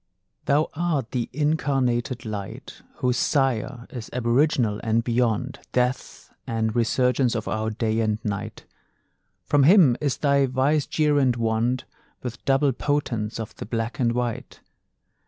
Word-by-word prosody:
Thou 150 Hz, +3 st, +2 dB
art 155 Hz, -7 st, -1 dB
the 120 Hz, -3 st, -2 dB
incarnated 135 Hz, -4 st, 0 dB
Light 105 Hz, -3 st, -7 dB
Whose 125 Hz, -1 st, 0 dB
Sire 130 Hz, -3 st, 0 dB
is 120 Hz, -5 st, -7 dB
aboriginal, 120 Hz, -2 st, +1 dB
and 115 Hz, 0 st, +1 dB
beyond 120 Hz, +2 st, 0 dB
Death 125 Hz, +1 st, -2 dB
and 110 Hz, -1 st, -1 dB
resurgence 125 Hz, +1 st, +2 dB
of 110 Hz, -, -3 dB
our 110 Hz, 0 st, -1 dB
day 110 Hz, 0 st, -1 dB
and 110 Hz, -1 st, +1 dB
night; 105 Hz, +1 st, -4 dB, 0.8 s
From 145 Hz, -, +3 dB
him 155 Hz, -, +6 dB
is 140 Hz, -3 st, 0 dB
thy 140 Hz, -2 st, +3 dB
vicegerent 140 Hz, 0 st, +2 dB
wand 115 Hz, +2 st, 0 dB, 0.4 s
With 125 Hz, -1 st, -6 dB
double 135 Hz, +1 st, +3 dB
potence 120 Hz, -6 st, -2 dB
of 110 Hz, -, -6 dB
the -, -, -6 dB
black 115 Hz, +2 st, -3 dB
and 120 Hz, -2 st, +2 dB
white. 120 Hz, -1 st, -4 dB
125 Hz, 130 wpm, -24 LUFS, 115-140 Hz, 0.8 s, him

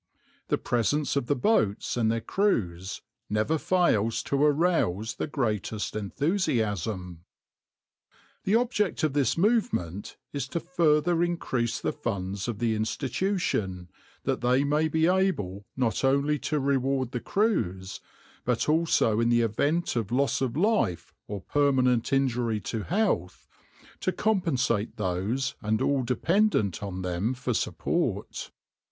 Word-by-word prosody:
The -, -, +1 dB
presence 140 Hz, +6 st, 0 dB
of 140 Hz, -4 st, 0 dB
the 145 Hz, -, +2 dB
boats 120 Hz, -, +1 dB
and 115 Hz, -2 st, +2 dB
their 115 Hz, 0 st, -1 dB
crews 95 Hz, -, -1 dB, 0.3 s
never 110 Hz, +10 st, +1 dB
fails 115 Hz, -, +2 dB
to 140 Hz, +1 st, 0 dB
arouse 145 Hz, -, +2 dB
the -, -, -2 dB
greatest 110 Hz, -8 st, -2 dB
enthusiasm. 105 Hz, -, -1 dB, 1.2 s
The 200 Hz, -, +2 dB
object 225 Hz, -8 st, +1 dB
of 155 Hz, -3 st, +2 dB
this 140 Hz, -2 st, +1 dB
movement 170 Hz, -, 0 dB, 0.2 s
is 140 Hz, -2 st, -2 dB
to 170 Hz, -, -2 dB
further 170 Hz, -1 st, +2 dB
increase 130 Hz, -10 st, -1 dB
the -, -, -2 dB
funds 100 Hz, -2 st, -3 dB
of 120 Hz, -4 st, -3 dB
the 115 Hz, 0 st, +1 dB
Institution, 110 Hz, -, -1 dB, 0.3 s
that -, -, -1 dB
they 125 Hz, +3 st, +3 dB
may 150 Hz, +2 st, +2 dB
be 160 Hz, 0 st, +2 dB
able 165 Hz, -, 0 dB
not 125 Hz, -2 st, 0 dB
only 140 Hz, +2 st, +2 dB
to 150 Hz, -, +1 dB
reward 135 Hz, -2 st, 0 dB
the 125 Hz, -, -2 dB
crews, 95 Hz, -, -1 dB, 0.4 s
but 125 Hz, -1 st, 0 dB
also 155 Hz, -8 st, +2 dB
in 115 Hz, 0 st, +2 dB
the 120 Hz, 0 st, +4 dB
event 145 Hz, +10 st, 0 dB
of 115 Hz, -3 st, -2 dB
loss 135 Hz, +3 st, +1 dB
of 130 Hz, 0 st, -1 dB
life, 200 Hz, -, +1 dB
or 100 Hz, -2 st, -5 dB
permanent 130 Hz, -2 st, +2 dB
injury 125 Hz, -5 st, +1 dB
to 110 Hz, +3 st, -3 dB
health, 145 Hz, -, -1 dB, 0.5 s
to 185 Hz, -, 0 dB
compensate 130 Hz, -, 0 dB
those 105 Hz, +7 st, -1 dB
and 110 Hz, +1 st, 0 dB
all 140 Hz, -2 st, +1 dB
dependent 125 Hz, -, +1 dB
on 95 Hz, -2 st, -5 dB
them 90 Hz, +7 st, -1 dB
for 125 Hz, 0 st, -2 dB
support. -, -, -2 dB
125 Hz, 135 wpm, -27 LUFS, 105-160 Hz, 1.2 s, the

